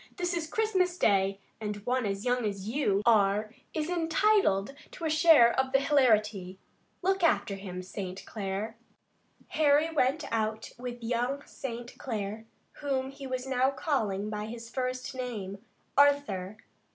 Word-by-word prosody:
This 355 -1 -1
is 335 -2 -2
Christmas 375 -5 +1
Day, 195 - +2 0.2
and 210 -1 -3
one 250 -2 +1
as 195 +2 -3
young 245 0 +1
as 200 -2 -3
you 220 -5 +1
are 215 -1 +3 0.2
is 310 -1 -2
entitled 330 - +2 0.2
to 335 - -6
a 315 - +1
share 310 -7 +6
of 265 0 0
the 270 - +6
hilarity. 215 -10 +2 0.5
Look 385 0 +1
after 205 -10 +3
him, 185 -2 -6
St. 185 0 -6
Clair." 210 +2 -4 0.7
Harry 305 +1 +3
went 300 0 +1
out 220 -1 -1
with 245 -1 -6
young 245 +4 -1
St. 240 -2 -7
Clair, 220 -2 -4 0.3
whom 270 -2 -2
he 275 0 -8
was 255 0 -3
now 260 0 +2
calling 220 - -1
by 210 0 -4
his 230 +1 -8
first 255 0 -3
name, 215 -7 -5 0.4
Arthur. 270 -9 +3
245 Hz, 145 wpm, -29 LUFS, 210-285 Hz, 0.7 s, share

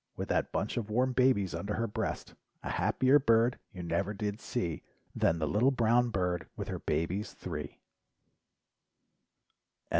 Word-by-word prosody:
With - - -5
that - - +1
bunch 105 - -2
of 110 -3 -2
warm 125 +4 +1
babies 125 -8 +3
under 100 +5 -3
her 115 - 0
breast. 105 - -3 0.3
A - - -3
happier 130 - +3
bird 115 -1 +3
you 90 -4 -7
never 100 +4 -1
did 105 +1 -3
,see 85 -10 -2 0.3
Than 85 - +2
the 80 -2 -1
little 110 - +3
brown 120 -1 +3
bird 90 -4 -1
with - - -5
her - - -3
babies 95 +6 -2
three. - - -6
105 Hz, 150 wpm, -31 LUFS, 95-120 Hz, 0.3 s, babies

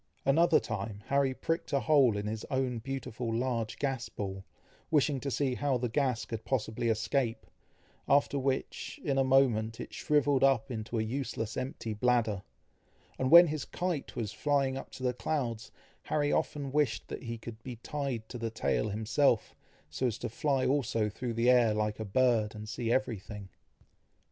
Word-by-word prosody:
Another 165 +4 +5
time, 105 0 -5
Harry 140 -1 +3
pricked 165 +5 -2
a 140 - +3
hole 135 -8 +4
in 100 - -3
his 110 +1 -3
own 130 -3 0
beautiful 125 -2 -4
large 115 -1 -1
gas 135 -4 -2
ball, 95 -1 -5 0.5
wishing 145 -3 +2
to 140 - -3
see 135 +1 0
how 135 0 0
the 125 0 -2
gas 125 -1 0
could 115 -1 -5
possibly 115 -2 -1
escape, 115 +2 0 0.6
after 140 0 +3
which, 135 0 -2
in 135 -2 +1
a - - +4
moment, 120 -5 +3
it - - -7
shrivelled 145 -2 +2
up 130 -4 +3
into 115 0 -4
a 110 - +1
useless 115 -2 -3
empty 130 -4 -4
bladder, 110 -3 +1 0.8
and 130 - +1
when 170 +3 +10
his 155 -3 -3
kite 175 -5 -3
was 110 -4 -3
flying 140 -3 +1
up 135 - -6
to 130 - -10
the 125 -1 +1
clouds, 120 -5 -2 0.4
Harry 145 -1 +1
often 145 -3 -1
wished 145 -5 0
that - - -6
he 115 -2 -5
could 110 0 -9
be 125 +1 -7
tied 125 -2 -4
to 120 - -7
the 115 0 -2
tail 110 -1 0
himself, 110 +3 +1 0.4
so 75 +12 0
as 115 -2 -2
to 120 - -4
fly 135 +2 0
also 120 -6 +1
through 120 +2 -4
the 115 +1 +1
air 120 -4 +5
like 105 0 -1
a 110 - -3
bird, 110 -1 +2
and 105 0 -7
see 115 0 -2
every 125 -4 +1
thing. 105 -1 -9
125 Hz, 180 wpm, -31 LUFS, 110-135 Hz, 0.8 s, when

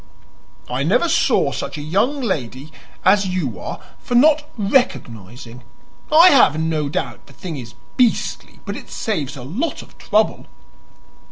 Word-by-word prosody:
"I 125 +2 -3
never 210 - +2
saw 330 +1 +2
such - - -5
a - - -5
young 215 - 0
lady 145 - -4 0.3
as 195 +1 +4
you 180 - -3
are - - -6 0.2
for 245 - -4
not 300 +4 +4
'recognizing.' 125 - -2 0.5
I 330 +4 +8
have 195 - +5
no 160 -2 -1
doubt 125 -6 -4
the 140 - -16
thing 165 +5 -7
is 120 -3 -9 0.2
BEASTLY, 245 -3 0
but - - -4
it - - -10
saves 150 - -3
a 125 - -8
lot 220 - -4
of - - -21
trouble." - - 0
165 Hz, 150 wpm, -20 LUFS, -, 0.5 s, I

